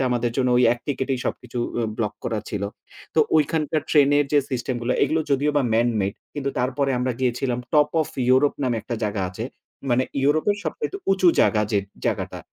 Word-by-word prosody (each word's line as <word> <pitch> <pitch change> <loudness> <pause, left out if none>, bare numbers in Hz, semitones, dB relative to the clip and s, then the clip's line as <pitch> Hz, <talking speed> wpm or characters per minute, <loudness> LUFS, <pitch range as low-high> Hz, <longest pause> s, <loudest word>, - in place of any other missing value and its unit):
সেটা - - +2
আমাদের 120 -1 0
জন্য 130 -2 +2
ওই 125 - +4
এক 120 - -5
টিকেটেই 135 -1 -1
সবকিছু 125 0 -4 0.2
উ - - +1 0.2
ব্লক 105 -3 -1
করা 110 -2 -1
ছিল। 100 -2 -3 0.5
তো 160 - +5 0.2
ঐখানকার 155 0 +1
ট্রেনের 145 -1 +5
যে 145 - +6
সিস্টেম 130 0 -2
গুলা 125 +2 0
এগুলো 160 - +2
যদিও 140 +2 +2
বা 145 - +4
man 115 +2 +3
made 95 +1 -2 0.2
কিন্তু 140 -1 -2
তারপরে 135 +2 0
আমরা 125 0 0
গিয়েছিলাম 125 0 0
টপ 150 -1 +4
ওফ 155 - -1 0.2
ইউরোপ 130 +3 +4
নামে 125 -3 +1
একটা 120 - -4
জায়গা 105 -2 -1
আছে। 95 +5 -6 0.5
মানে 125 +2 +3 0.2
ইউরোপের 155 +8 +2
সবচাইতে 440 -4 -3 0.2
উঁচু 190 -2 +4
জায়গা 105 -1 +3
যে 105 - +4 0.3
জায়গাটা, - - -2
130 Hz, 190 wpm, -23 LUFS, 120-145 Hz, 0.5 s, যে